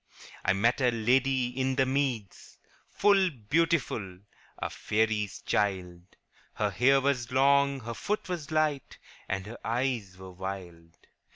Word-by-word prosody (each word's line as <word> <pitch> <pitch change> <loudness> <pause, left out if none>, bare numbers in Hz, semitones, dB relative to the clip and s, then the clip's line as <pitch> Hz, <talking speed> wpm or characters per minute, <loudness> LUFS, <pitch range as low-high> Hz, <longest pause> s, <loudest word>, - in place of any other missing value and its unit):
' - - -16
I 90 - +3
met 115 +7 +2
a 125 - +4
lady 125 +2 +2
in 130 +1 -1
the 135 -1 +3
meads 130 -7 -2 0.3
Full 195 -2 +3
beautiful, 135 - -1 0.4
a - - -4
faery's 105 -2 -1
child; 95 -3 -1 0.5
Her 105 -1 0
hair 130 +8 +4
was 130 -4 -1
long, 140 +1 +3
her 115 +1 -5
foot 210 - -3
was 175 -6 -4
light, 155 -3 0 0.3
And 95 -1 -2
her 115 +3 -9
eyes 115 -5 -2
were 95 0 -10
wild. 90 -3 -8
120 Hz, 135 wpm, -29 LUFS, 100-135 Hz, 0.5 s, a